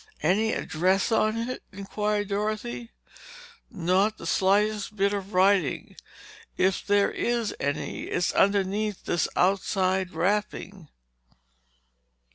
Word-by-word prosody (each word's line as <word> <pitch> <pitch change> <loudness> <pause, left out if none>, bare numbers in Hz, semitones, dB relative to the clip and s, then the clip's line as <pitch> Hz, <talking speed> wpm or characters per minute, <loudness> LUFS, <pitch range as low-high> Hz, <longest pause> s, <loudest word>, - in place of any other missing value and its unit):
"Any 210 +7 +2
address 185 +7 0
on 215 0 +2
it?" 240 +2 -3
inquired 205 +1 -2
Dorothy. 215 +3 -3 0.8
"Not 195 +1 +1
the - - -9
slightest 205 +4 +1
bit 200 0 +1
of 200 0 -5
writing. 185 -5 +2 0.6
If 190 0 +1
there 205 0 +2
is 235 -2 -1
any, 145 +1 -3
it's 175 - 0
underneath 200 +1 +1
this 175 - +1
outside 190 0 +1
wrapping." 190 0 -2
200 Hz, 100 wpm, -26 LUFS, 185-210 Hz, 0.8 s, Any